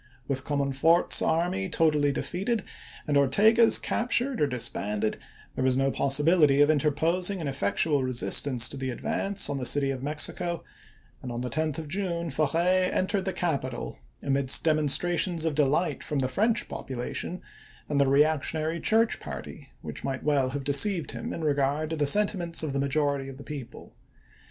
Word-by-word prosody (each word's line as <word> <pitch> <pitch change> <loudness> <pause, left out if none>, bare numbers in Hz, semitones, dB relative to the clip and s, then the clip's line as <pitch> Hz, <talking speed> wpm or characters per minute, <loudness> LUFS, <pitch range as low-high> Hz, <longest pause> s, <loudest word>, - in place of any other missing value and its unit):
With 135 -2 -3
Comon 140 -2 -1
f 135 0 -8
ort's 170 +2 +4
army 180 +4 0
totally 150 -4 +2
defeated 195 - -2 0.4
and 145 - 0
Ortega's 215 - +5
captured 245 - -1
or 150 - +3
disbanded, 110 -4 -2 0.3
there 130 - -3
was 130 -1 +2
no 135 0 +1
possibility 145 +1 +3
of 145 +1 +5
interpos 160 +5 +1
ing 200 -2 -4
an 160 - -4
effectual 140 +3 0
resistance 130 0 +2
to - - -6
the 130 0 -3
advance 195 +10 -2
on 140 - -3
the 130 - -4
city 140 -1 +2
of 130 -2 -5
Mexico, 155 +4 -2 0.6
and 125 - -6
on 120 0 -4
the 125 -1 -4
10th 155 0 -2
of 160 -2 -6
June 170 -1 -3
Forey 170 +6 +1
en 185 - 0
tered 195 0 -1
the 190 - -1
capital 135 - -3 0.2
amidst 135 -1 +2
demonstrations 165 +2 +1
of 160 - 0
delight 150 +4 0
from 150 - -3
the 130 -1 0
French 215 - 0
population 130 +7 -5 0.5
and 145 -1 +1
the 140 - +3
reactionary 155 +3 +1
church 225 +6 +2
party, - - -9
which - - -8
might 135 -1 -4
well 140 -3 +1
have 140 +1 -5
deceived 155 +3 +2
him 115 - -6
in 165 - -5
regard 145 +1 0
to - - -1
the 150 -2 0
sentiments 180 -2 +2
of 150 -3 -3
the 140 - -1
majority 140 -1 -1
of 135 - -10
the 140 - -10
people. 140 -5 -9
150 Hz, 175 wpm, -27 LUFS, 135-170 Hz, 0.6 s, Ortega's